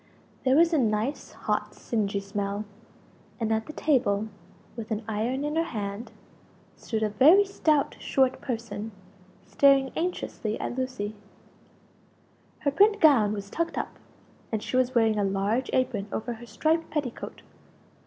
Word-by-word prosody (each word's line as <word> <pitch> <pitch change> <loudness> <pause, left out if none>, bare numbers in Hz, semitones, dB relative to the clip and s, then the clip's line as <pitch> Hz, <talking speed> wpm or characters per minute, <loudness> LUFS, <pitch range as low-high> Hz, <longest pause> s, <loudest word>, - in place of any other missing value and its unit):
There 260 +1 +4
was 335 +2 +5
a 310 - +4
nice 220 +3 -1
hot - - -2
singey 200 -3 -2
smell; 200 +1 -3 0.7
and 225 -1 -1
at 220 0 -1
the 305 - -7
table, 220 -9 +1 0.5
with 230 -2 -6
an 220 -1 -2
iron 230 +6 -1
in 300 +1 -2
her 330 - +3
hand 210 -6 -5 0.6
stood 220 -2 -3
a 215 - +2
very 310 - +6
stout 310 -7 +1
short 265 -1 +1
person 225 -3 -4 0.5
staring 275 -1 +4
anxiously 320 -10 -3
at - - -3
Lucie. 255 -5 -3 1.5
Her 285 - +1
print 410 +8 +4
gown 260 - +5
was 200 -1 -6
tucked 335 0 -2
up, - - -4 0.5
and 220 -1 -2
she - - -4
was 255 0 +2
wearing 220 -2 +3
a - - +2
large 200 +6 0
apron 225 -6 0
over 240 +2 -3
her 235 +1 -11
striped 320 +5 0
petticoat. 285 -6 -4
235 Hz, 145 wpm, -27 LUFS, 210-280 Hz, 1.5 s, very